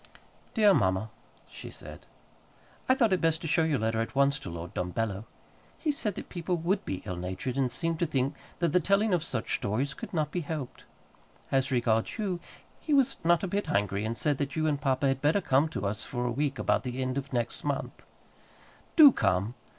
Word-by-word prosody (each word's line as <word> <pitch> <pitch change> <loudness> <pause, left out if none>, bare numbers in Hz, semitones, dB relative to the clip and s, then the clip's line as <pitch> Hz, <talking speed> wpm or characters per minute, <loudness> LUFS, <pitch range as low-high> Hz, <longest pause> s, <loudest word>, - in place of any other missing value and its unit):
DEAR 210 -3 +6
MAMMA 95 - +1 0.4
[she - - -10
said], - - -9 0.8
I 260 - +6
thought 230 -6 +3
it 185 - +1
best 165 -1 +2
to - - -2
show 165 +2 +3
your 160 -3 +2
letter 110 0 0
at 115 - -5
once 140 0 +3
to - - -7
Lord 85 +3 -7
Dumbello. 100 +3 -2 0.5
He 310 - 0
said 230 - -3
that - - -7
people 175 0 -2
would 180 +5 0
be 95 - -4
ill 90 -3 -3
natured, 95 +8 -4
and 135 -3 +1
seemed 165 +4 0
to 170 - +1
think 135 0 0 0.2
that 170 0 +1
the 180 - +3
telling 200 +4 +2
of 175 -3 +2
such 125 -8 -3
stories 125 +8 -1
could - - -8
not 155 -5 -1
be 180 - -1
helped. 150 -4 -6 0.7
As 135 0 +2
regards 120 -3 +1
you, 195 -5 -2 0.4
he 300 - +1
was 275 -1 +3
not 170 +2 +3
a - - 0
bit 200 +3 -2
angry, 100 +1 0
but 115 +1 -3
said 140 +5 +1
that 140 -1 -2
you 155 -1 0
and 145 -2 0
papa 135 0 +1
had 135 0 0
better 150 +7 +3
come 145 -4 +3
to 100 -10 -4
us 105 +3 -2
for 125 -1 -3
a 120 - 0
week 140 +2 -1
about - - +1
the 125 0 -5
end 130 0 -1
of 140 0 -4
next 120 -2 -1
month. 145 -2 -3 0.9
Do 300 -4 +10
come. 100 - +1
140 Hz, 210 wpm, -29 LUFS, 115-170 Hz, 0.9 s, Do